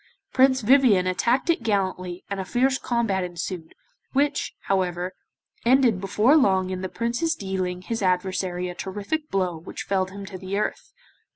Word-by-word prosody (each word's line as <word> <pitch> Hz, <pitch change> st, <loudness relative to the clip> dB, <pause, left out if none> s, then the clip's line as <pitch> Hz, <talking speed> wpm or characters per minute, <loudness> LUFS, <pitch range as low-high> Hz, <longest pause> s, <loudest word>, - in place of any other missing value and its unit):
Prince 260 Hz, 0 st, +4 dB
Vivien 230 Hz, -5 st, +5 dB
attacked 235 Hz, -, +1 dB
it 330 Hz, -, -1 dB
gallantly 185 Hz, -4 st, -1 dB
and 200 Hz, -1 st, -4 dB
a -, -, -1 dB
fierce 260 Hz, +7 st, +1 dB
combat 225 Hz, -6 st, 0 dB
ensued, 175 Hz, -1 st, -5 dB, 0.4 s
which, 285 Hz, +2 st, 0 dB
however, 180 Hz, -1 st, -1 dB, 0.5 s
ended 240 Hz, -5 st, +4 dB
before 210 Hz, +8 st, +3 dB
long 190 Hz, -10 st, +3 dB
in 185 Hz, 0 st, -3 dB
the 185 Hz, -, -3 dB
Prince's 240 Hz, -, -1 dB
dealing 185 Hz, -2 st, -3 dB
his 225 Hz, +3 st, -3 dB
adversary 180 Hz, -1 st, 0 dB
a 180 Hz, -, -5 dB
terrific 205 Hz, -, -4 dB
blow 185 Hz, -3 st, 0 dB
which 160 Hz, +3 st, -7 dB
felled 190 Hz, -1 st, 0 dB
him 200 Hz, +1 st, -8 dB
to 190 Hz, -1 st, -8 dB
the 190 Hz, +2 st, -3 dB
earth. 210 Hz, -, -3 dB
195 Hz, 160 wpm, -25 LUFS, 185-235 Hz, 0.5 s, Vivien